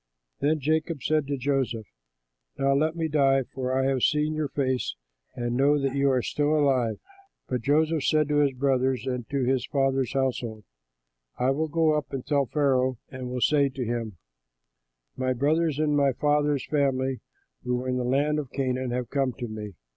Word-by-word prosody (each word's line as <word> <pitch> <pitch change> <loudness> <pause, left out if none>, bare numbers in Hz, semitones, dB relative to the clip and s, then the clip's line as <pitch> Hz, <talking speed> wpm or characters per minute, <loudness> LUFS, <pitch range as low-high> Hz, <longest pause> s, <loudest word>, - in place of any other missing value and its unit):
Then 155 +2 +1
Jacob 155 0 -1
said 155 -3 +1
to 140 0 -2
Joseph, 130 -4 -1 0.7
"Now 135 0 +2
let 155 +4 +1
me 165 -1 -1
die, 135 -3 +3
for 130 +1 -2
I 135 - +1
have 135 -1 +1
seen 150 +3 +2
your 155 -1 -1
face 130 - -1 0.4
and 120 0 -2
know 140 +3 +4
that 135 -1 -1
you 140 0 +3
are 130 -2 +1
still 150 +1 +1
alive." 130 -6 +2 0.5
But 125 -2 -2
Joseph 155 +3 +2
said 155 -1 +3
to 150 - +2
his 145 -2 +3
brothers 130 -2 0
and 125 -3 -3
to 140 -2 0
his 125 -1 0
father's 135 -2 0
household, 125 -5 -2 0.7
"I 125 +2 +2
will 155 +4 0
go 160 0 +2
up 150 - -3
and 135 -2 -4
tell 140 -2 +1
Pharaoh 130 -3 +1
and 130 -1 -6
will 125 0 -3
say 140 0 +3
to 130 -1 -4
him, 115 -4 -3 1.0
'My 130 0 0
brothers 150 +4 +1
and 150 -1 +1
my 140 -2 +3
father's 145 0 +1
family 135 -3 0 0.4
who 125 0 0
were 125 +1 -3
in 125 0 0
the 125 - -1
land 145 +4 +1
of 140 -4 -5
Canaan 130 -1 -2
have 125 0 -3
come 135 -2 0
to 120 -1 -6
me. 105 -3 -7
135 Hz, 185 wpm, -26 LUFS, 125-145 Hz, 1.0 s, know